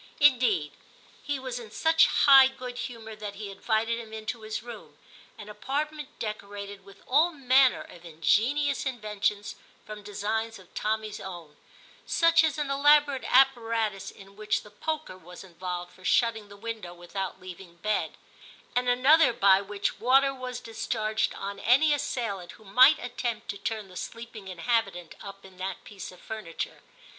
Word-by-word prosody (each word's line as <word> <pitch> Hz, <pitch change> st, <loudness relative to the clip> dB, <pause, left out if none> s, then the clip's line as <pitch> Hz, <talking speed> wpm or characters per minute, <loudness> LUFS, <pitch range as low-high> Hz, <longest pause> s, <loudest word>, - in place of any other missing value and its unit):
Indeed, 240 Hz, -, +4 dB, 0.5 s
he 290 Hz, -1 st, -2 dB
was 255 Hz, -2 st, -5 dB
in 230 Hz, -3 st, -10 dB
such 320 Hz, +8 st, +4 dB
high 270 Hz, -2 st, +7 dB
good 255 Hz, -2 st, -7 dB
humour 225 Hz, -3 st, -7 dB
that 205 Hz, -1 st, -6 dB
he 200 Hz, -1 st, -7 dB
invited 225 Hz, +3 st, 0 dB
him 220 Hz, -2 st, -10 dB
into 220 Hz, +2 st, -5 dB
his 215 Hz, 0 st, -5 dB
room, 240 Hz, -2 st, -11 dB, 0.4 s
an 210 Hz, -, -10 dB
apart 280 Hz, +8 st, -3 dB
ment 300 Hz, -2 st, -10 dB
decorated 200 Hz, -2 st, -6 dB
with 195 Hz, 0 st, -17 dB
all 310 Hz, +7 st, +4 dB
manner 265 Hz, -2 st, +4 dB
of 175 Hz, -, -15 dB
ingenious 245 Hz, -, +1 dB
inventions 210 Hz, -4 st, -2 dB, 0.3 s
from 215 Hz, -1 st, -8 dB
designs 215 Hz, +2 st, -3 dB
of 185 Hz, -2 st, -18 dB
Tommy's 215 Hz, 0 st, -2 dB
own; 170 Hz, -5 st, -9 dB, 0.5 s
such 335 Hz, 0 st, +4 dB
as 315 Hz, -1 st, 0 dB
an 290 Hz, -2 st, -2 dB
elaborate 285 Hz, -1 st, +4 dB
apparatus 230 Hz, -6 st, +2 dB
in 195 Hz, 0 st, -15 dB
which 215 Hz, 0 st, -1 dB
the 210 Hz, -, -15 dB
poker 305 Hz, -4 st, -4 dB
was 180 Hz, +2 st, -12 dB
involved 180 Hz, 0 st, -6 dB
for 185 Hz, -, -19 dB
shutting 225 Hz, 0 st, +2 dB
the 205 Hz, -, -12 dB
window 215 Hz, -5 st, -6 dB
without 180 Hz, +2 st, -5 dB
leaving 180 Hz, -1 st, -11 dB
bed, 210 Hz, +5 st, -2 dB, 0.6 s
and 245 Hz, 0 st, +1 dB
another 270 Hz, +5 st, +5 dB
by 195 Hz, -3 st, +5 dB
which 200 Hz, 0 st, -3 dB
water 270 Hz, +3 st, +4 dB
was 255 Hz, -1 st, -6 dB
discharged 220 Hz, -2 st, -2 dB
on 200 Hz, 0 st, -6 dB
any 280 Hz, +8 st, +4 dB
assailant 210 Hz, -10 st, -3 dB
who -, -, -18 dB
might 255 Hz, +9 st, +6 dB
attempt 240 Hz, -3 st, -4 dB
to 200 Hz, -, -3 dB
turn 215 Hz, -3 st, -3 dB
the 185 Hz, -, -15 dB
sleeping 230 Hz, -1 st, -8 dB
inhabitant 190 Hz, -1 st, -1 dB
up 195 Hz, -1 st, -10 dB
in 190 Hz, -1 st, -15 dB
that 185 Hz, 0 st, -5 dB
piece 195 Hz, -4 st, -9 dB
of 180 Hz, -, -16 dB
furniture. 215 Hz, -7 st, -6 dB
220 Hz, 160 wpm, -27 LUFS, 195-255 Hz, 0.6 s, high